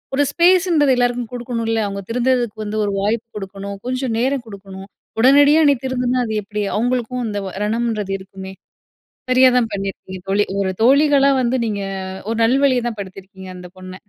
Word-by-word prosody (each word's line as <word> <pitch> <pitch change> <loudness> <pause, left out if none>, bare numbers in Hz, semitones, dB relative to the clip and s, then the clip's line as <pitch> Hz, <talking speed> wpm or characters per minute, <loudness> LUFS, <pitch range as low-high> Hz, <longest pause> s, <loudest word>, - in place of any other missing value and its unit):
ஒரு 285 - +3
ஸ்பேஸ்ன்றது 340 -4 +3
எல்லாருக்கும் 245 -1 0
குடுக்கணுன்ல. 230 -2 -2
அவுங்க 200 0 -5
திருந்துறதுக்கு 245 -2 0
வந்து 210 +1 -4
ஒரு 200 - -1
வாய்ப்பு 220 +3 -1
குடுக்கணும். 200 0 -7
கொஞ்ச 255 +1 -2
நேரம் 265 +1 0
குடுக்கணும். 195 -2 -10 0.3
உடனடியா 285 +5 +6
"நீ - - +5
திருந்துனா, 250 -1 -1
அது 220 - -4
எப்பிடி?" 210 +1 -4
அவுங்களுக்கும் 245 +2 -1
இந்த 205 -1 -3 0.2
ரணம்ன்றது 215 -2 -2
இருக்குமே! 190 0 -10 0.8
சரியா 255 0 +6
தான் 240 -2 +2
பண்ணியிருக்கீங்க. 195 -1 -6
தோழி, 200 +2 +2 0.2
ஒரு 190 -1 0
தோழிகளா 280 +2 +5
வந்து 250 +1 0
நீங்க 205 -2 -3 0.5
ஒரு 225 - -1
நல்வழிய 260 +1 +3
தான் 225 -3 -7
படுத்தியிருக்கீங்க 190 -1 -10
அந்த 180 0 -10
பொண்ண. 185 0 -9
230 Hz, 155 wpm, -19 LUFS, 200-255 Hz, 0.8 s, உடனடியா